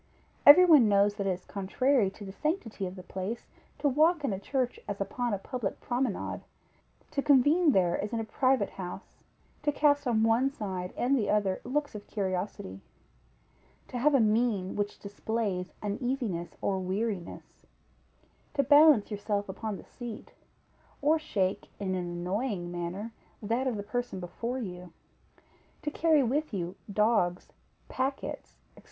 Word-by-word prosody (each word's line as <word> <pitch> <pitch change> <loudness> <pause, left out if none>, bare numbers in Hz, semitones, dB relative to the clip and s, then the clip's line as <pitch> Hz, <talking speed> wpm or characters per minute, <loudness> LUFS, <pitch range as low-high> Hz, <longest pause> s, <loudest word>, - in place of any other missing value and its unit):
Every 345 +6 +11
one 295 -11 +7
knows 200 0 +4
that 200 -2 -1
it - - +2
is 180 -1 -3
contrary 210 +3 +1
to 200 +1 -11
the 190 - -7
sanctity 225 - -2
of 180 - -8
the 185 - -9
place, 195 +6 -5 0.3
to 295 - +1
walk 310 +4 +3
in 220 - 0
a 190 - -3
church 255 +3 -2
as 205 -1 -4
upon 240 +4 -2
a 200 - 0
public 215 +1 -4
promenade; 245 -3 -2 0.7
to 280 - 0
convene 295 +5 +5
there 180 -6 +2
as 210 - -4
in 230 - -1
a - - -1
private 255 -1 +1
house; 185 +1 -8 0.4
to 295 0 +1
cast 285 -1 +2
on 220 -2 +2
one 230 +4 +3
side 190 -8 -5
and 255 +3 +2
the 215 -6 0
other 200 -3 +1
looks 290 +3 -2
of 210 -1 -9
curiosity; 185 - -3 1.1
to 245 - -4
have 295 +3 +4
a - - +5
mien 215 -3 +1
which 205 0 -2
displays 200 -2 -3
uneasiness 210 - -2
or 195 -1 0
weariness; 190 0 -4 0.9
to 280 - +3
balance 290 -5 +6
yourself 205 0 -2
upon 205 +1 -4
the - - -11
seat, 240 -4 -9 0.7
or 310 +3 +3
shake 195 -11 -1
in 190 -2 -2
an 185 -1 -1
annoying 180 +1 -2
manner 175 +6 -4 0.3
that 230 +5 -1
of 240 -4 -1
the 205 - -4
person 240 -1 -3
before 230 +8 -4
you; 180 -7 -6 0.9
to 295 - -2
carry 315 -2 +3
with 275 0 -1
you 180 0 -3 0.2
dogs, 205 -4 +1 0.4
packets, 270 +2 -3 0.2
&c. - - -15
215 Hz, 160 wpm, -29 LUFS, 190-260 Hz, 1.1 s, Every